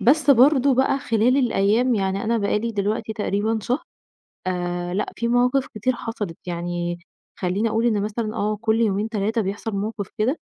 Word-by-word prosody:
بس 280 +7 +4
برضه 270 +1 +5
بقى 265 +1 +2
خلال 230 +2 +2
الأيام 240 0 +2
يعني 195 0 -1
أنا 230 +1 +1
بقى 200 0 +1
لي 230 +1 -3
دلوقتي 210 +2 -1
تقريبًا 215 +1 -1
شهر، 250 +9 -1 0.6
آآ، 175 -1 -2
لأ 200 - -2
في 235 0 -1
مواقف 250 +3 +2
كتير 255 +5 0
حصلِت، 220 -8 -5
يعني 175 0 -3 0.4
خلّيني 195 +5 0
أقول 225 +2 +1
إن 210 -3 +2
مثلًا 215 +1 -3
آه، 210 +1 0
كُلّ 225 0 +1
يومين 210 0 +1
3 220 +1 -1
بيحصل 205 +3 -3
موقف 205 0 -3
كده، 250 +9 +1
220 Hz, 170 wpm, -23 LUFS, 200-240 Hz, 0.6 s, برضه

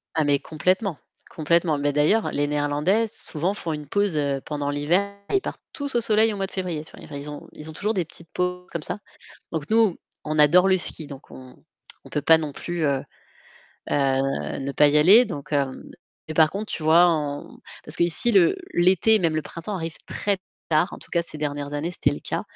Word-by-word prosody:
Ah 155 -2 +2
mais 145 -1 +3
complètement! 180 +3 0 0.3
Complètement. 160 -1 +1
Mais 145 0 +1
d'ailleurs, 150 +10 +2
les 145 0 0
néerlandais, 150 +9 +1
souvent 180 0 -3
font 165 -5 -4
une 150 -1 -6
pause, 200 -1 +1
heu, 140 -2 0
pendant 145 -1 -3
l'hiver. 175 +8 0 0.2
Et 395 - +4
ils - - -1
partent - - -6
tous 285 -3 -5
au 235 - +3
soleil 220 0 +3
au - - -5
mois 195 - -1
de - - -11
février. 175 -5 -3
C'est-à-dire 155 - -13
ils 145 +1 -6
ont 145 - -9
ils 150 - -9
ont - - -8
toujours 210 +5 -1
des 180 -3 0
petites 165 +1 -15
pauses 180 0 -2
comme 160 -3 -4
ça. - - -1 0.5
Donc 160 -2 -4
nous, 220 -5 +4 0.3
on 155 0 -2
adore 180 +6 +6
le 190 -1 +4
ski, 160 -3 -2
donc 140 -1 -11
on 130 -1 -12 0.5
on - - -12
peut 150 - -1
pas 160 +2 +6
non 155 -2 -4
plus, 175 -2 -4
heu, 140 -2 +2 0.9
heu 135 -1 0
ne 140 0 -3
pas 150 +1 +5
y 150 +1 +4
aller. 200 +11 +7
Donc, 150 - -7
heu 140 -1 +3 0.6
mais 155 - -4
par 155 -1 +5
contre, 210 +2 -5
tu 155 - -4
vois 165 +3 +6
on 145 -3 -3 0.3
parce 150 - -5
qu'ici 170 +8 +1
le 195 - +5 0.2
l'été, 190 +5 +4
même 160 -2 +1
le 155 - 0
printemps, 170 +5 -6
arrive 165 -1 -4
très 200 -2 -1 0.3
tard, 155 +4 +2
en - - -7
tout - - -16
cas 170 - +2
ces 155 -2 -7
dernières 145 -1 -3
années, 160 +4 -2
c'était - - +1
le 75 - -5
cas. - - -3
160 Hz, 220 wpm, -24 LUFS, 145-185 Hz, 0.9 s, aller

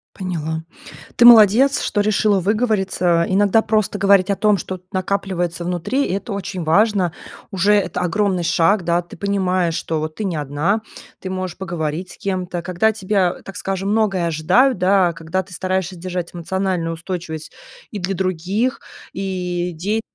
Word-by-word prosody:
Поняла. 160 -4 -4 0.5
Ты 240 - +6
молодец, 240 +4 +7
что 205 - 0
решила 205 -1 +2
выговориться. 190 -5 +1
Иногда 205 +3 +3
просто 215 -2 0
говорить 200 0 +4
о - - +1
том, 210 +1 +2
что 185 - -5
вот 185 - -14
накапливается 185 -3 -2
внутри, 180 +11 -1
это 200 +3 -3
очень 185 -3 -4
важно. 185 +1 +2 0.4
Уже 195 +2 +2
это 205 -3 +1
огромный 185 0 0
шаг, 175 +4 +2
да. 170 +1 +1
Ты 175 - -13
понимаешь, 185 -3 0
что 160 -1 -2
вот 155 0 -4
ты 215 - -4
не 180 -4 -2
одна. 150 +9 -1 0.4
Ты 185 - -6
можешь 185 -1 -4
поговорить 175 -1 -4
с - - -13
кем-то, 180 -3 -3
когда 180 +4 +1
от 220 - +1
тебя, 190 -2 0
так 195 - -10
скажем, 195 0 -3
многое 195 -6 +1
ожидают, 185 - +3
да, 185 -2 +3
когда 165 +4 -3
ты 185 - -14
стараешься 185 0 -2
держать 180 0 -5
эмоциональную 175 -1 -2
устойчивость 165 -2 -6 0.4
и 205 - -5
для 185 +2 -2
других, 190 +8 -1 0.3
и 180 -2 -3
идеи 205 +7 -2
185 Hz, 160 wpm, -20 LUFS, 175-200 Hz, 0.5 s, молодец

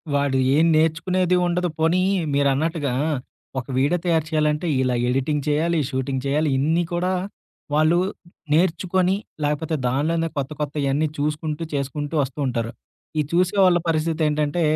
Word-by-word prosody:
వాడు 140 -2 +1 0.2
ఏం 160 +2 +4
నేర్చుకునేది 170 +3 +2
ఉండదు, 175 0 0
పోనీ 165 +3 +3 0.3
మీరన్నట్టుగా 140 0 +1 0.7
ఒక - - -7
వీడియో 145 +7 +2
తయారు 160 -3 +2
చేయాలంటే 150 +1 +1
ఇలా 125 -1 +1
ఎడిటింగ్ 135 +3 0
చేయాలి, 160 +2 +1
షూటింగ్ 130 0 -2
చేయాలి 150 +2 +1
ఇన్ని 160 +5 +2
కూడా 180 +2 0 0.6
వాళ్ళు 155 +3 +4 0.6
నేర్చుకొని 185 +2 +2 0.3
లేకపోతే 150 +2 -1
దానిలోనే 165 +6 0
కొత్త 140 +2 -2
కొత్తయన్నీ 145 0 0
చూసుకుంటూ, 150 +2 -2
చేసుకుంటూ 145 +2 -3
ఒస్తూ 135 +2 -7
ఉంటారు. 115 -2 -2 0.5
ఈ - - +5
చూసేవాళ్ళ 185 0 +4
పరిస్థితి 160 0 0
ఏంటంటే 150 +2 0
155 Hz, 125 wpm, -22 LUFS, 140-170 Hz, 0.7 s, ఈ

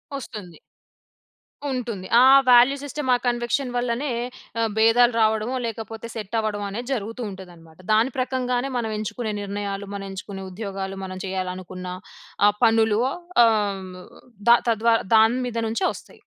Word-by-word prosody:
ఒస్తుంది. 205 - -8 1.1
ఉంటుంది. 230 -7 -4
ఆ - - +7 0.2
వాల్యూ 250 +3 +7
సిస్టమ్, 285 -1 -4
ఆ - - +6
కన్విక్షన్ 240 +2 0
వల్లనే 245 +3 -1 0.5
ఆహ్, 225 -1 +1
భేదాలు 230 +2 +5
రావడమో 220 +3 +1
లేకపోతే 225 0 -6
సెట్ 215 0 -5
అవ్వడమనేది 210 +3 -3
జరుగుతూ 230 +1 -4
ఉంటదన్నమాట. 175 -3 -13
దాని 230 +5 +3
ప్రకంగానే 255 0 -1
మనం 225 -2 -2
ఎంచుకునే 215 +1 -3
నిర్ణయాలు, 200 0 -4
మనం 200 0 -5
ఎంచుకునే 195 0 -7
ఉద్యోగాలు, 195 -1 -5
మనం 185 0 -6
చేయాలనుకున్న 185 -1 -5 0.6
ఆ - - +7
పనులు 225 -1 +4 0.5
ఆహ్, 225 -1 +4 0.2
హ్మ్, 185 -1 -9 0.6
ద 235 - +8
తద్వారా 225 +1 +3 0.2
దాని 225 +3 +4
మీద 230 -1 -5
నుంచే 230 +12 -1
వస్తాయి. - - -13
220 Hz, 135 wpm, -23 LUFS, 195-240 Hz, 1.1 s, ద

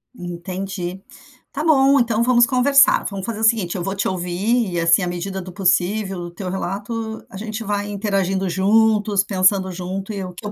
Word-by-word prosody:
Entendi. 180 +1 -6 0.5
Tá 295 +2 -4
bom, 275 -3 +4
então 235 -1 +1
vamos 240 -1 +5
conversar. 275 +2 +4
Vamos 195 -2 -6
fazer 220 -1 -4
o - - -4
seguinte, 220 -6 +2
eu 180 - -3
vou 195 +2 -3
te 195 - -1
ouvir 190 +5 -1
e, 175 - -1
assim, 165 +3 +4
à 180 - -1
medida 185 +2 -4
do 185 0 -9
possível, 190 +2 0
do 175 0 -7
teu 185 +2 -6
relato, 210 +4 -4
a 190 - -10
gente 220 +2 -5
vai 205 0 -2
interagindo 195 -2 -1
juntos, 205 +2 +2
pensando 190 -1 +2
junto, 190 +3 -5
e 195 -2 -4
o 180 -1 -7
que 190 +5 -11
eu 205 - -4
195 Hz, 195 wpm, -20 LUFS, 185-220 Hz, 0.5 s, vamos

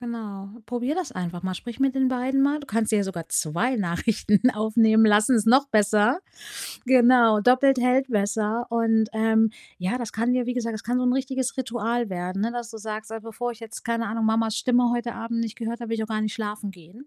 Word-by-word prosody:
Genau, 215 -5 -7 0.2
probier 245 +5 -2
das 345 -9 -3
einfach 175 0 -5
mal, 185 0 -2
sprich 240 +6 -8
mit 270 -1 +1
den 265 -1 +2
beiden 260 +2 0
mal. 285 +2 +2
Du 290 - -11
kannst 225 -2 0
dir 205 -2 +2
sogar 170 -4 -6
2 225 +12 0
Nachrichten 205 +5 +1
aufnehmen 220 0 +3
lassen, 215 +4 +4
ist 220 -1 0
noch 265 +4 +5
besser. 210 - +3 0.7
Genau, 245 -3 +5
doppelt 255 +4 +4
hält 255 +2 +2
besser. 215 +1 -1
Und, 225 -1 +2
ähm, 220 0 +2 0.3
ja, 190 +8 -2
das 235 -3 -5
kann 235 +3 0
ja 250 - 0
wie 250 +1 -3
gesagt, 230 -2 -2
das 215 - -7
kann 245 +2 -1
so 250 - 0
'n 250 - +3
richtiges 260 -1 -2
Ritual 235 -2 -2
werden, 185 +2 -3
ne, 230 - 0
dass 240 -1 -5
du 225 - -9
sagst: 215 +1 -6
„Also, 225 - -6
bevor 240 +2 -5
ich 235 - -16
jetzt, 225 -1 -9
keine 230 -1 -1
Ahnung, 225 +1 -2
Mamas 220 0 +1
Stimme 245 -1 +2
heute 240 -1 -3
Abend 230 0 -4
nicht 230 -1 -3
gehört 230 0 -4
habe, 235 -1 -6
will - - 0
ich - - -1
auch 220 - -5
gar 215 -1 -2
nicht 215 -1 -2
schlafen 210 -2 -5
gehen“, 185 - -16
230 Hz, 225 wpm, -24 LUFS, 215-245 Hz, 0.7 s, noch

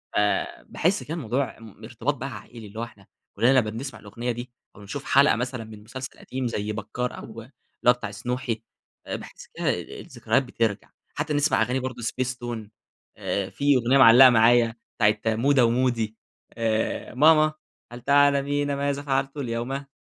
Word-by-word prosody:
آآ، 105 0 0
باحس 190 +5 0
كان 160 +3 -5
الموضوع 130 0 -2
م 110 -1 -14
ارتباط 120 +5 -2
بقى 135 +1 -5
عائلى، 115 -3 -12
اللي 110 +3 -9
هو - - -2
إحنا 105 -4 -12 0.3
كلنا 115 +5 +4
لمّا 110 -3 -1
بنسمع 115 +1 -6
الأغنية 120 +4 -4
دي 120 +1 -7 0.2
أو - - -14
بنشوف 130 +8 -6
حلقة 140 +2 +5
مثلًا 125 0 -3
من 110 -1 -12
مسلسل 130 +4 -8
قديم 130 -1 -4
زي 105 -2 -3
بكار 115 +4 -4
أو - - -8 0.2
اللي 120 +4 -15 0.4
هو 125 - +9
بتاع 115 -4 -7
سنوحي 115 +1 -3 0.4
آآ، - - -4
باحس - - -10
كده - - -2 0.3
الذكريات - - -1
بترجع 115 -4 -2 0.3
حتى 150 - -2
نسمع 145 -4 +2
أغاني 125 +4 +1
برضه 130 -2 -5
spacetoon 120 -3 -3 0.5
آآ، 100 -1 -2
في 145 0 +2
أغنية 125 +2 +3
معلقة 130 0 +9
معايا 115 0 +4 0.3
بتاعة 105 0 +4 0.2
مودة 135 +1 +4
ومودي 115 -2 0 0.4
آآ، 110 -1 -1
ماما 155 +3 +5 0.4
هل 120 0 -9
تعلمين 145 +1 +3
ماذا 140 0 -1
فعلت 135 0 -1
اليوم؟ 120 -2 -3
هل 135 +1 -4
125 Hz, 170 wpm, -25 LUFS, 115-135 Hz, 0.5 s, هو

